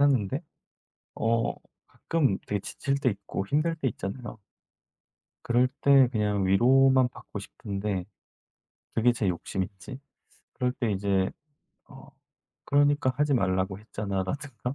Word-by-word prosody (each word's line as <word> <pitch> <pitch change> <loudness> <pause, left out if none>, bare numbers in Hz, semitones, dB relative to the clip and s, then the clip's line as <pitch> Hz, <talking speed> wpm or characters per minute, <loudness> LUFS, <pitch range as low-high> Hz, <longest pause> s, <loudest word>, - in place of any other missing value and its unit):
하는데 135 -2 +2 0.7
어 115 0 +1 0.3
가끔 140 -12 0
되게 105 -1 -1
지칠 135 +7 -2
때 135 - +2
있고 100 -1 -5
힘들 155 +8 +1
때 140 -4 0
있잖아요. 115 +2 -6 1.1
그럴 120 +2 +3
때 135 -2 +6
그냥 105 -4 0
위로만 130 +6 +5
받고 105 - -9
싶은데 100 -2 -4 0.9
그게 120 +2 +4
제 105 -4 -1
욕심인지, 95 +7 -4 0.6
그럴 125 -1 0
때 120 -3 -2
이제 95 -1 +1 0.6
어 - - -13 0.6
"그러니까 145 -2 +3
하지 145 -1 +2
말라고 95 -3 0
했잖아."라든가 110 +6 -4
115 Hz, 250 characters per minute, -27 LUFS, 100-135 Hz, 1.1 s, 때